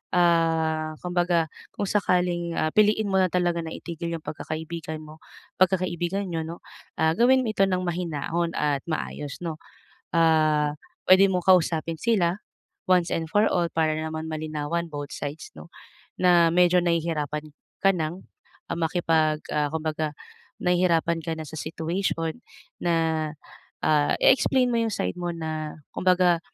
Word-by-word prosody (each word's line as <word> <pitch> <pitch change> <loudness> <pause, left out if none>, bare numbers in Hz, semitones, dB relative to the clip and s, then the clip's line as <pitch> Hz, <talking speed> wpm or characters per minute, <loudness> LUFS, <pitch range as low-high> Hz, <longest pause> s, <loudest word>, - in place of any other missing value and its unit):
ah, 165 -2 +2
kumbaga 175 -2 +1 0.3
kung - - -2
sakaling, 180 -4 +1
ah, 155 - +1
piliin 215 0 +3
mo 190 - +2
na 185 - +4
talaga 175 -1 +1
na 160 - -6
itigil 170 0 -5
yung 160 - -8
pagkakaibigan 160 +1 -5
mo 155 +1 -13 0.4
pagkakaibigan 185 0 +1
niyo 165 -2 -2
'no, 170 - -8 0.4
ah, 160 0 +4
gawin 260 +2 +5
mo 220 - 0
ito 195 -2 +3
ng 185 -1 0
mahinahon 170 -1 -2
at 145 -2 +1
maayos, 150 -2 -4
'no. 165 -2 -4 0.6
Ah, 155 -2 +3 0.3
pwede 190 +1 +8
mong 180 -2 -1
kausapin 165 -2 +3
sila 195 -6 +2 0.5
once 180 -2 +4
and 165 -1 -2
for 210 +1 +4
all 175 - +1
para 160 -1 +1
naman 160 0 -4
malinawan 155 +2 -3
both 145 -1 -5
sides, 150 - -6
'no, - - -11 0.5
na 175 -2 +5
medyo 180 0 +5
nahihirapan 155 -3 -1 0.3
ka 195 - +6
ng 165 +2 -3 0.5
makipag 160 -2 +1 0.2
ah, 150 -1 +1
kumbaga 155 -1 -2 0.5
nahihirapan 175 -2 +2
ka 165 - -2
na 160 - -5
sa - - -12
situation 165 +1 -2 0.5
na, 165 -2 +1 0.6
ah, 150 -1 +3
i-explain 260 -1 +4
mo 235 - +1
yung 225 - 0
side - - -2
mo 175 0 -2
na 155 -2 -5 0.2
kumbaga, 180 -2 +3
165 Hz, 140 wpm, -25 LUFS, 155-180 Hz, 0.6 s, pwede